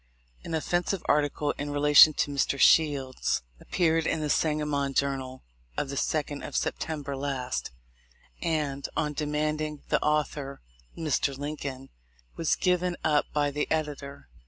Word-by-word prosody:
An 165 - -3
offensive 175 +3 -1
article 145 0 +1
in 145 +1 -3
relation 145 +1 +7
to 145 - 0
Mr. 140 0 0
Shields 140 - +3 0.2
appeared 165 -2 +1
in 160 - 0
the 150 -1 -1
Sangamon 150 -3 0
Journal 135 -2 -1 0.3
of 140 - -1
the 140 - -4
2d 145 0 -1
of - - -7
September 145 -3 -2
last; 135 -2 -3 0.7
and, 150 -4 -1
on 150 -1 0
demanding 150 0 -2
the - - +2
author, 150 -2 -1 0.4
Mr. 145 -3 0
Lincoln 140 -2 -5 0.5
was 165 - +1
given 180 -1 +1
up 150 -2 +3
by 145 -1 +1
the 150 +1 -2
editor. 145 - -3
150 Hz, 135 wpm, -28 LUFS, 140-155 Hz, 0.7 s, relation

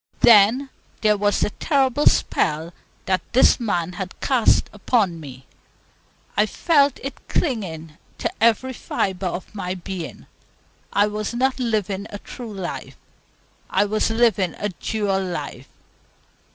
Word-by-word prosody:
Then 235 +5 +6 0.3
there 215 -1 +4
was 205 0 +1
the - - +1
terrible 280 +1 +1
spell 160 +1 +1 0.3
that 185 -2 +1
this 255 - +5
man 180 -7 -1
had 185 +1 -6
cast 255 -5 +3
upon 205 -4 +1
me. 135 -3 -10 0.9
I 210 +1 +3
felt 285 0 +2
it 275 0 -4
clinging 165 - -2 0.2
to - - -2
every 230 +3 +3
fibre 190 -5 -2
of 180 +3 -5
my 185 -3 -3
being. 180 -1 -7 0.7
I 205 - +4
was 210 +2 -3
not 260 +1 +1
living 210 -4 -1
a 205 - -6
true 235 +2 -9
life; 190 -3 -6 0.7
I - - +2
was 215 +2 0
living 225 -6 +2
a 205 - -2
dual 195 0 -1
life. 150 -7 -6
205 Hz, 130 wpm, -22 LUFS, 185-235 Hz, 0.9 s, Then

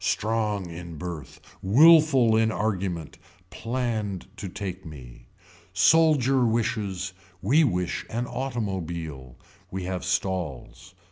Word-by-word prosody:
Strong 105 -4 -1
in 85 0 -8
birth. 80 -4 -7 0.2
Willful 135 - +6
in 110 0 +3
argument. 95 -7 -3 0.3
Planned 115 -5 -3
to 100 - -5
take 95 0 -6
me. 65 -8 -12 0.5
Soldier 145 -5 +4
wishes. 105 -5 -1 0.3
We 140 - +4
wish 90 - -1
an 120 +2 -2
automobile. 85 - -4 0.3
We 95 0 -5
have 90 0 -3
stalls. 90 -5 -3
100 Hz, 105 wpm, -26 LUFS, 90-115 Hz, 0.5 s, Willful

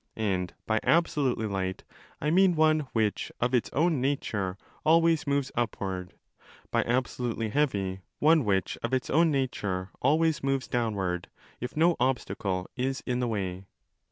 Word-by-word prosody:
And 95 -5 -1
by 110 0 +1
absolutely 145 -8 +2
light 95 -2 -3 0.4
I 150 - 0
mean 185 0 +5
one 155 -2 +3
which 110 -3 0
of 120 +2 0
its 125 - +2
own 160 -2 +2
nature 105 -9 -1 0.3
always 165 -1 +4
moves 140 -1 0
upward, 95 -6 -3 0.6
by - - +3
absolutely 120 -2 -1
heavy 100 -9 0 0.2
one 155 0 +4
which 95 -4 0
of 120 +3 0
its 130 - -2
own 165 +3 +4
nature 105 -10 -2
always 155 +3 +2
moves 135 -3 0
downward, 100 -8 -1 0.3
if 125 +4 -6
no 170 +2 +4
obstacle 100 -7 -1
is 130 +1 -2
in 125 -1 -1
the 125 - 0
way. 95 -4 -3
125 Hz, 145 wpm, -28 LUFS, 100-150 Hz, 0.6 s, mean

